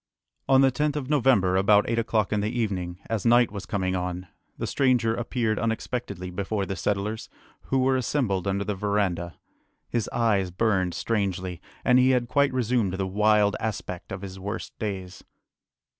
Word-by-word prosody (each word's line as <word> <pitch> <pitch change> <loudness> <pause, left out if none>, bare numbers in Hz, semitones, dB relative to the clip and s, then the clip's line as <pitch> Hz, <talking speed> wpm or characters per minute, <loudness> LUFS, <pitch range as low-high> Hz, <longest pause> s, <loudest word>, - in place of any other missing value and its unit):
On 135 0 +6
the 135 -1 +5
10th 150 +3 0
of 145 -1 -3
November, 120 -10 +3
about 100 +2 +4
eight 115 0 0
o'clock 110 -2 0
in 105 - +1
the 105 - -1
evening, 95 -7 -2
as 110 -3 -2
night 120 -1 +4
was 100 -1 -7
coming 95 -2 -1
on, 90 0 -3 0.3
the - - -3
stranger 125 -4 +2
appeared 115 -2 -1
unexpectedly 115 -4 -3
before 100 +2 -2
the 95 - -4
settlers, 105 +5 -2 0.4
who 135 - 0
were 130 0 +3
assembled 120 -8 0
under 100 +1 0
the 105 - -2
verandah. 95 -4 -1 0.6
His 115 -3 -1
eyes 105 -6 +1
burned 95 -2 0
strangely, 95 -5 -2 0.2
and 125 0 +5
he 130 +1 +5
had 120 -1 -3
quite 140 +3 +2
resumed 120 -6 0
the 95 0 -1
wild 105 +1 +3
aspect 100 -5 -5
of 95 +1 -6
his 95 -1 -7
worst 100 +2 -5
days. 95 -4 -5
105 Hz, 170 wpm, -26 LUFS, 95-120 Hz, 0.6 s, On